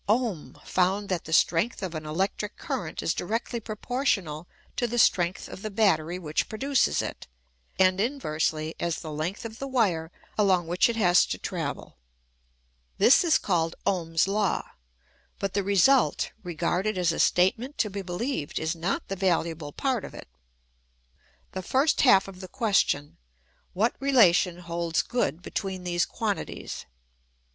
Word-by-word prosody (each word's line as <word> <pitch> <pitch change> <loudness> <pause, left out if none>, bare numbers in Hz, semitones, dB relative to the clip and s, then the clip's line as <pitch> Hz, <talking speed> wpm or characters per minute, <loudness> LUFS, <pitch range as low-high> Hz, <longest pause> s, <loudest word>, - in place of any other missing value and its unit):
Ohm 210 - -1
found 190 +3 +1
that 180 -3 -2
the 160 - -8
strength 175 +7 +2
of 180 -3 -3
an 155 -1 -6
electric 190 +6 -2
current 160 -4 -4
is - - +1
directly 230 +5 -3
proportional 210 - -2 0.3
to 240 - 0
the 240 +1 -3
strength 180 -5 +2
of - - -9
the 215 - -4
battery 180 -6 +1
which 155 -4 -2
pro 215 - -6
duces 275 +1 +2
it, - - -7 0.5
and 185 0 +4
inversely 160 - -1
as 170 -2 -1
the 155 - -6
length 165 +9 -4
of 225 0 -8
the 275 - -4
wire 185 -11 0 0.3
along 190 -4 +3
which 175 +7 +2
it 235 - -1
has 180 -5 +5
to - - -3
travel. - - -5 1.0
This 320 +10 +6
is 335 -3 +4
called 165 -3 0
Ohm's 170 -3 +1
law; 200 -1 0 0.7
but 195 -1 -3
the 200 - +1
result, 200 +7 +3
regarded 180 +3 -1
as 175 -2 +2
a - - -4
statement 220 +10 +2
to 210 - 0
be 200 +1 -4
beheved, 185 - -3
is 160 +2 -1
not 170 +4 -2
the 195 - -3
valuable 170 -5 -1
part 255 - -1
of - - -9
it. - - -10 1.2
The 190 - -4
first 270 - +2
half 195 -8 +5
is 190 -1 -10
the 185 - -7
ques 220 -3 +1
tion: 145 0 -1 0.6
what 220 +6 +1
relation 185 -10 +4
holds 170 -1 -1
good 175 - -1
between 190 -2 -4
these 175 -1 0
quantities? 65 - -4
185 Hz, 155 wpm, -27 LUFS, 170-220 Hz, 1.2 s, This